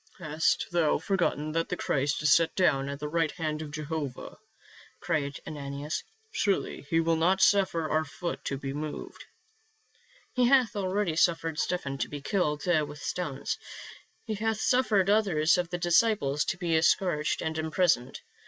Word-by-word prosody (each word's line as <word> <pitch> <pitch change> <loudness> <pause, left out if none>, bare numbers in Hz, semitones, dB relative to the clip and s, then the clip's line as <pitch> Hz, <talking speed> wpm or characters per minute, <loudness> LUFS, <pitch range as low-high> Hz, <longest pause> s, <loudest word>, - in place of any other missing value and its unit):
" - - -27
Hast 155 -2 0
thou 170 -3 +2
forgotten 160 -3 -1
that 165 +1 -1
the 180 - -2
Christ 140 +2 0
is 150 - +6
set 165 -1 +3
down 140 -7 +2
at 140 - -4
the 150 - -4
right 165 +1 +1
hand 155 -3 -3
of 155 - -6
Jehovah?" 150 -3 -5 0.6
cried 140 -2 -2
Ananias. 145 0 -5 0.3
"Surely 200 - -1
he 165 - +3
will 165 0 +2
not 180 +4 +2
suffer 190 -5 +3
our 155 +1 +1
foot 170 +3 -5
to 140 - -2
be 135 0 -5
moved." 150 +1 -6 0.6
" - - -33
He 250 -1 +3
hath 250 -4 +4
already 190 -3 -1
suffered 165 -1 +1
Stephen 140 -7 -2
to - - -2
be 145 - -6
killed 150 -2 -1
with 155 -4 +1
stones. 145 -4 -3 0.7
He 220 - -3
hath 220 +1 -1
suffered 215 -8 +2
others 190 -6 +3
of 175 -1 -2
the 175 - -3
disciples 175 -5 +2
to - - -2
be 165 -3 +1
scourged 160 -3 +1
and 160 0 -2
imprisoned. 160 -5 +1
165 Hz, 165 wpm, -28 LUFS, 150-185 Hz, 0.7 s, is